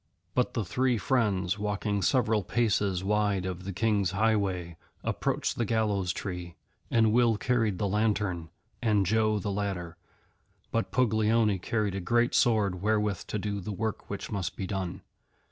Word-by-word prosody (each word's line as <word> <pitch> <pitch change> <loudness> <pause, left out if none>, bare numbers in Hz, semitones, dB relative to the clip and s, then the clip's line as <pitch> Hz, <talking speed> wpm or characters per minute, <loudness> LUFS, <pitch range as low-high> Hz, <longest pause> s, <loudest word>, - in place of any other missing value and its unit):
But 125 - 0
the 115 -4 0
three 125 +6 +1
friends, 100 -6 +1
walking 105 0 -1
several 110 +1 +2
paces 100 -3 +1
wide 105 -2 +1
of 90 0 -5
the 100 - -3
King's 100 -1 +1
highway, 100 -6 +1 0.3
approached - - -1
the - - +3
Gallows 105 -5 +1
Tree, 90 -2 -5 0.3
and 110 -2 +3
Will 120 -2 +4
carried 115 -5 +1
the 100 - 0
lantern 100 -5 0 0.3
and 105 -4 +2
Joe 110 +2 +2
the 100 0 -2
ladder, 95 -4 -3 0.7
but 115 - 0
Puglioni 110 -4 +2
carried 105 +1 -1
a 100 - -2
great 120 +6 +2
sword 105 -7 +2
wherewith 105 -1 0
to - - -2
do 100 0 -2
the 105 - -5
work 110 +2 -3
which 100 - -5
must 95 -5 -2
be 95 - -4
done. 95 -2 -4
105 Hz, 155 wpm, -29 LUFS, 95-110 Hz, 0.7 s, Will